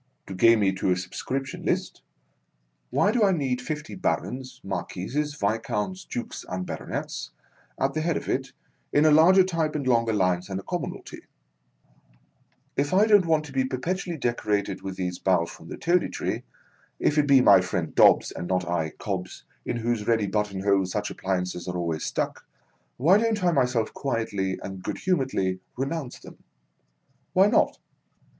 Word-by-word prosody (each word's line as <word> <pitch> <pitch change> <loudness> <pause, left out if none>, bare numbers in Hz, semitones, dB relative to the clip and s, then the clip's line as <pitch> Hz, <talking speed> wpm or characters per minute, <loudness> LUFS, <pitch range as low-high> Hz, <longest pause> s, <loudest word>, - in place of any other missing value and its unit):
To - - -7
gain 115 +4 +5
me 95 -1 +3
to 95 - 0
a 90 - +3
Subscription 130 +9 -4
list, - - -1 0.9
why 205 - +2
do 235 -1 +2
I 200 - +5
need 135 -7 -1
fifty 150 +4 -5
Barons, 130 -7 -3
Marquises, 145 +11 -3
Viscounts, 110 - -2
Dukes, 120 - -5
and 90 0 -3
Baronets, - - -5 0.5
at 135 +1 +1
the 155 - -1
head 165 0 0
of - - -6
it, - - -1 0.4
in 145 - +4
larger 185 +5 +7
type 165 -4 -1
and 145 -3 -2
longer 115 -2 +3
lines 90 -3 +1
than 95 -1 -4
the 95 - -6
commonalty - - -5
1 - - -32 1.5
If 145 +5 +1
I 205 +3 +6
don't 205 -5 +5
want 155 -2 +2
to 145 - -10
be 135 -1 +1
perpetually 165 +7 -3
decorated 105 -6 -1
with 95 -1 -5
these 90 -1 -3
boughs 90 -3 +1
from 80 - -13
the - - -7
Toady 175 +2 +2
Tree - - -3 0.3
— - - -36
if 150 - +3
it 145 - +2
be 140 -1 +7
my 110 -6 +7
friend 90 -3 -3
Dobbs, - - +5
and 85 - -6
not 90 -1 0
I, 80 -3 -1
Cobbs, 95 -3 -5 0.2
in - - -1
whose 115 -2 -1
ready 115 -3 +3
button 105 -1 -1
hole 100 -1 +2
such 90 - -3
appliances 90 -2 -3
are 90 0 -3
always 85 -3 -2
stuck - - -2 0.3
— 60 0 -43
why 175 +11 +5
don't 220 -3 0
I 175 - +4
myself 125 -6 +1
quietly 105 -8 -2
and 95 -1 -7
good - - -4
humouredly 130 - 0 0.2
renounce 135 0 -3
them? - - -15 0.9
Why 190 +1 +6
not 210 - +3
120 Hz, 175 wpm, -26 LUFS, 95-155 Hz, 1.5 s, larger